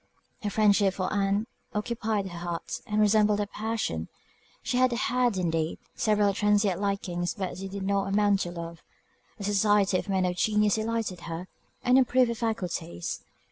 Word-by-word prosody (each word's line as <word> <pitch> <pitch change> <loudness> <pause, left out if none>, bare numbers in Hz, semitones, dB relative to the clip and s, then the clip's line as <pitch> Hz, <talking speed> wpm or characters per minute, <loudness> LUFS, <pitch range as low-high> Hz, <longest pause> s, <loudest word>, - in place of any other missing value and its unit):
Her 210 - -1
friendship 200 -2 +3
for 185 +1 -2
Ann 200 +1 +1 0.3
occupied 215 -1 -1
her 175 -1 -7
heart, 170 -1 -4
and 210 0 0
resembled 210 0 +4
a 205 - +1
passion. 210 - -3 0.6
She 250 - -1
had 255 0 +4
had, 240 -1 +1
indeed, 165 -3 0 0.2
several 210 -2 +2
transient 205 -2 +2
likings; 180 -3 -1
but 190 -3 -3
they 195 - -5
did 195 0 -5
not 195 0 +1
amount 205 0 +3
to 175 - -2
love. 170 -1 -7 0.6
The 205 - -7
society 205 -1 +3
of - - -7
men 190 -1 +2
of 180 0 -1
genius 210 +1 +3
delighted 220 -4 -1
her, 165 +2 -5 0.4
and 250 +1 +5
improved 255 -1 +3
her - - 0
faculties. 195 - -3
200 Hz, 165 wpm, -28 LUFS, 185-215 Hz, 0.6 s, and